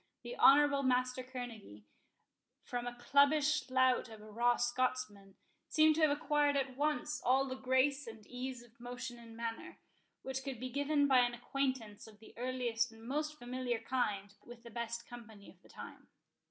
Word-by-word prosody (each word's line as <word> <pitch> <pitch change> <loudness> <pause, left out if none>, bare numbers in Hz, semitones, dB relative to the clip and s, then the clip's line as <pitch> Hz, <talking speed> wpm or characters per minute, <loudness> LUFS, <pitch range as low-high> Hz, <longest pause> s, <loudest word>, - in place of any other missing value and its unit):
The - - -6
honourable 285 0 +6
Master 255 -1 +1
Kerneguy, 240 - -8 0.8
from 245 0 -4
a 245 - -5
cubbish 285 +3 +3
lout 255 -1 +3
of 220 -1 -11
a 215 0 -12
raw 240 +2 +3
Scotsman, 240 -5 -2 0.3
seemed 310 0 +5
to 320 - -1
have 310 - +6
acquired 290 0 +2
at 265 -2 -2
once 300 +1 -1
all 265 +2 +3
the 260 - -4
grace 260 +2 +1
and 220 -2 -10
ease 250 0 -6
of 235 -1 -22
motion 245 0 -7
and 230 -1 -12
manner, 230 -1 -5 0.5
which 265 0 -4
could 265 -3 -5
be 255 +1 -5
given 285 +2 +2
by 265 -2 +6
an 245 -1 +2
acquaintance 245 -5 -3
of 215 -1 -15
the 220 - -15
earliest 245 -1 -1
and 225 0 -15
most 300 +3 -2
familiar 245 -1 -3
kind 210 -4 -2
with 240 0 -13
the 235 - -11
best 235 0 -4
company 225 -4 -12
of - - -25
the - - -21
time. - - -11
250 Hz, 175 wpm, -35 LUFS, 235-275 Hz, 0.8 s, honourable